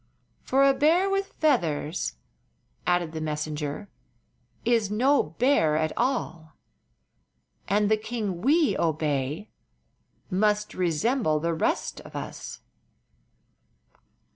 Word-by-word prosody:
"For 275 +1 +3
a 275 - +5
bear 330 +8 +3
with 390 0 -1
feathers," 165 - 0 0.7
added 175 -2 +1
the 160 -1 -5
messenger, 150 +3 -3 0.8
"is 230 -3 +2
no 260 +7 +3 0.2
bear 235 - +3
at 155 0 0
all, 200 -11 -2 1.1
and 205 +1 +2
the 215 +1 +3
king 215 -5 -4
we 300 +4 +3
obey 155 +2 -1 0.8
must 210 +2 +1
resemble 175 - +1
the 165 +2 -1
rest 160 - -1
of - - -13
us." - - -7
205 Hz, 100 wpm, -26 LUFS, 155-250 Hz, 1.1 s, a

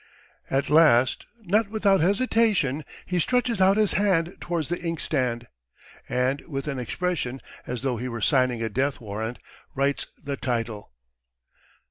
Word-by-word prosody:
At 135 +1 0
last, 150 -6 +4 0.2
not 210 +3 +2
without 200 -3 +2
hesitation, 200 - +2 0.2
he 180 -1 -1
stretches 245 +1 +1
out 190 +2 +5
his 215 -2 +3
hand 185 -4 +1
towards 170 -4 -2
the 175 - -3
inkstand, 130 -8 -1 0.6
and 130 +3 0
with 135 -3 -4
an 135 -3 -2
expression 135 0 -2 0.3
as 125 0 -4
though 130 -3 0
he 125 +3 -4
were 115 -1 -5
signing 125 +1 +2
a 115 - -1
death 135 +5 0
warrant, 110 +2 -5 0.4
writes 140 +1 0
the 140 -1 -5
title. 115 -5 -3
140 Hz, 140 wpm, -25 LUFS, 125-185 Hz, 0.6 s, out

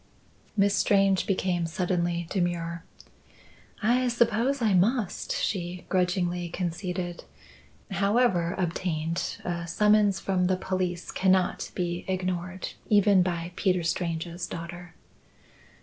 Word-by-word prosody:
Miss 200 0 +4
Strange 195 -2 +3
became 180 -3 0
suddenly 175 0 -1
demure. 170 -3 -1 1.0
"I 250 +3 +3
suppose 235 +3 +2
I 220 -4 +2
must," 205 +3 +1
she 180 -2 -2
grudgingly 180 -1 0
conceded. 175 0 -3 0.7
"However 195 -3 +2
obtained, 165 -2 -2
a 170 -1 -3
summons 210 +2 +3
from 185 -2 +1
the 185 0 +1
police 185 -2 -2
cannot 185 -1 +2
be 175 -1 -2
ignored 185 0 -2 0.2
even 205 -2 +5
by 175 -1 -2
Peter 180 -3 +1
Strange's 170 0 -2
daughter." 175 0 -8
180 Hz, 100 wpm, -27 LUFS, 175-195 Hz, 1.0 s, even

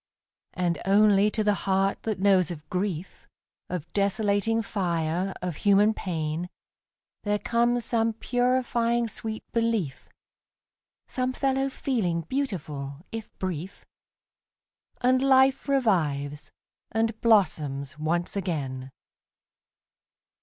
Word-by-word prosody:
And 175 -2 0
only 205 +1 +5
to 215 0 -1
the 210 0 +3 0.2
heart 195 +1 +2
that 220 -2 -2
knows 190 -3 +4
of 155 -3 -8
grief, 185 -2 -3 0.4
Of 175 -3 -5
desolating 205 +2 +1
fire, 175 -2 -1
of 175 -4 -3
human 205 +2 +4
pain, 165 -2 -3 0.7
There 205 0 +1
comes 235 +2 +1
some 225 -1 +1
purifying 240 0 +1
sweet 220 0 -5
belief, 225 - -1 1.0
Some 255 0 -1
fellow 270 0 0
feeling 210 -12 -1
beautiful, 160 - -4
if 225 -1 -6
brief. 185 0 -5 1.2
And 255 +1 +3
life 270 +1 +4
revives, 155 - 0 0.4
and 225 0 0
blossoms 150 - +2
once 170 +4 -1
again. 140 -9 -3
200 Hz, 100 wpm, -27 LUFS, 170-230 Hz, 1.2 s, only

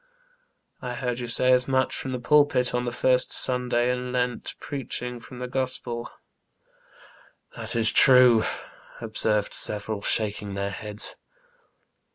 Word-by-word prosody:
I 125 -1 -5
heard 125 0 -3
you 120 - -5
say 125 +2 +2
as 125 0 +3
much 130 -1 0
from 130 - -4
the 130 - -2
pulpit 145 -2 +2
on 125 0 -1
the 120 - -2
first 125 +1 +1
Sunday 125 -1 +2
in 125 0 -4
Lent, 125 -1 -2
preaching 125 -3 -6
from 125 +2 -13
the 125 0 -5
Gospel." 125 -2 -3 0.7
" - - -27
That - - -5
is 115 -1 +4
true," 125 -4 +6 0.6
observed 110 -2 0
several, 105 0 0
shaking 105 -2 0
their 100 0 -3
heads. 105 +1 -2
125 Hz, 140 wpm, -25 LUFS, 115-125 Hz, 0.7 s, true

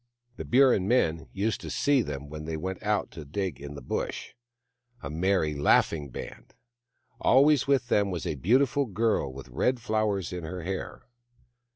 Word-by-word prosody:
The - - -6
Burrin 125 -7 +4
men 85 -10 +1
used 100 +2 -1
to - - -7
see 140 -2 +2
them 70 -7 -5
when 75 +1 -7
they 80 0 -3
went 95 +3 -5
out 105 -1 0
to 80 - -8
dig 80 0 -4
in 70 0 -7
the 70 - -9
Bush, - - -4 0.7
a 70 - -5
merry, 85 -1 +1
laughing 75 +1 +2
band. - - -9 0.6
Always 140 +1 +4
with 130 -3 +2
them 100 -3 +2
was 90 -3 -4
a - - -1
beautiful 130 - +2
girl 110 - 0
with 65 -1 -10
red 125 - 0
flowers 105 -5 -1
in 90 -1 -5
her 90 +2 -6
hair. 95 +2 -5
95 Hz, 170 wpm, -28 LUFS, 75-115 Hz, 0.7 s, Burrin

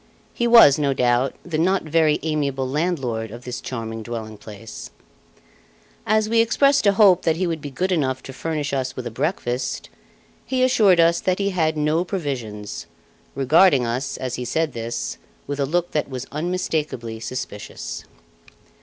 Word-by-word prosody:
He 240 - 0
was, 230 - +8
no 140 -2 +1
doubt, 125 +1 +2
the 165 -3 -2
not 185 +3 +2
very 155 -1 +2
amiable 140 -4 -1
landlord 135 -7 -1
of 120 +3 -10
this 125 0 -5
charming 115 -3 -5
dwelling 110 -1 -6
place. 105 +1 -10 1.2
As 215 0 +3
we 230 +1 +2
expressed 275 +2 +3
a 200 - +5
hope 195 -3 +6
that 160 - +1
he 185 +3 -1
would 165 -3 -2
be 145 - -6
good 185 +8 -2
enough 130 -6 0
to 135 - -9
furnish 150 -1 -3
us 130 -1 -2
with 125 - -6
a 120 - -4
breakfast, 125 - -2 0.5
he 255 -1 0
assured 215 -8 +4
us 170 0 +4
that 185 -1 +1
he 200 0 0
had 160 -4 0
no 150 +3 +1
provisions, 125 - -5 0.5
regarding 140 0 +4
us, 125 +4 -2
as 130 -2 -4
he - - -2
said 155 +4 -1
this, 115 0 -4 0.3
with 145 0 -4
a 140 - +1
look 175 +3 0
that 150 - -1
was 130 -2 -5
unmistakably 150 -8 -2
suspicious. 110 -3 -6
145 Hz, 165 wpm, -22 LUFS, 125-175 Hz, 1.2 s, was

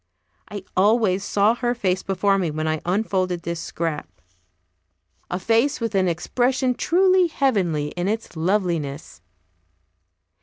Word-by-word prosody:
I 205 -2 -7
always 200 -1 +3
saw 205 +2 +2
her 240 0 -1
face 185 -5 0
before 195 +1 +1
me 175 -3 0
when 155 +1 -3
I 155 -1 -1
unfolded 185 -2 -1
this 170 0 -3
scrap, 165 - -4 1.2
a 180 - -2
face 230 +8 +1
with 230 -2 -3
an 190 -2 +2
expression 250 +9 0
truly 370 +5 +3
heavenly 190 - 0
in 175 +3 -3
its 220 -2 -3
loveliness. 165 -5 -2
195 Hz, 125 wpm, -22 LUFS, 170-230 Hz, 1.2 s, always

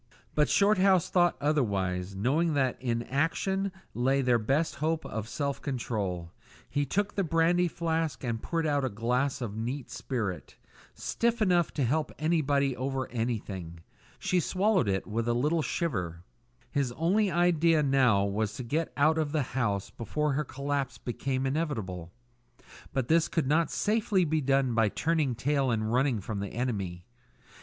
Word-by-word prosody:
But 150 -1 +2
Shorthouse 195 -3 +4
thought 175 -1 +3
otherwise, 100 -10 0
knowing 145 - +1
that 130 -3 +2
in 120 -2 -1
action 190 +9 0 0.2
lay 135 +3 +2
their 125 -2 +3
best 140 +9 0
hope 160 +2 -1
of 110 0 -5
self 140 0 -2
control. 100 -10 -3 0.4
He 145 0 -1
took 205 +8 0
the 195 - 0
brandy 170 +2 +3
flask 165 -3 -2
and 115 -2 -2
poured 165 -1 -1
out 145 -2 +1
a 130 - 0
glass 125 +5 -1
of 110 -4 -4
neat 120 +4 -4
spirit, 110 -9 -4 0.4
stiff 235 0 0
enough 180 -5 +3
to 145 - +1
help 150 +6 0
anybody 145 -4 +1
over 130 +1 -3
anything. 100 -8 -4 0.4
She 180 - +1
swallowed 190 - +2
it 95 0 0
with 115 +2 -2
a 120 - +2
little 150 +7 +1
shiver. 90 - -2 0.5
His 140 -4 0
only 190 - +2
idea 170 -2 +3
now 130 -8 +4
was 105 +1 -1
to 130 - -5
get 155 +7 -1
out 155 +3 +4
of 150 -2 -1
the 155 -2 +1
house 105 -7 -1
before 150 +6 -1
her 150 +3 0
collapse 140 -1 -3
became 130 +2 -2
inevitable; 110 - -2 0.8
but 130 -3 -1
this 165 +2 +4
could 165 -5 0
not 155 +3 +2
safely 210 -4 +1
be 155 0 +1
done 135 -2 +2
by 115 -2 +3
turning 155 -1 0
tail 135 +2 +1
and 110 -1 0
running 130 -4 +2
from 105 +1 -4
the 100 -1 -5
enemy. 100 -8 -3
135 Hz, 160 wpm, -29 LUFS, 115-160 Hz, 0.8 s, Shorthouse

